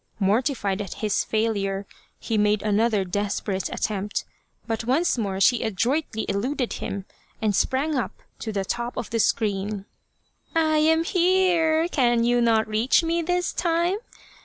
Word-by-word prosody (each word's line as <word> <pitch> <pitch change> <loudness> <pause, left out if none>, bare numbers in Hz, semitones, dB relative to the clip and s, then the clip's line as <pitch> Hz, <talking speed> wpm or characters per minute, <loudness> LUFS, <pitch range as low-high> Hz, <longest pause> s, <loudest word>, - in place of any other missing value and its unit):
Mortified 205 -1 +1
at 200 - -6
his 210 - +1
failure, 205 -3 -1 0.3
he 225 - -2
made 210 0 +2
another 215 0 +2
desperate 200 0 -2
attempt, 205 -1 -2 0.4
but 225 0 -2
once 275 +9 +2
more 200 -5 -2
she 240 +4 +4
adroitly 230 - -1
eluded 245 +6 -1
him, 195 -1 -5 0.3
and 215 -3 +1
sprang 275 +8 +1
up 250 -8 -3 0.2
to 220 - -4
the 195 -2 -2
top 240 +3 -3
of 240 - -4
the 230 - 0
screen. 205 -2 0 0.4
'' - - -38
I 315 -1 +3
am 320 +1 +3
here! 345 -3 +3
Can 240 -8 +2
you 240 +1 +3
not 225 -2 +3
reach 220 +9 +2
me 335 +1 0
this 355 +2 -1
time 345 +3 +1
230 Hz, 150 wpm, -24 LUFS, 205-310 Hz, 0.4 s, she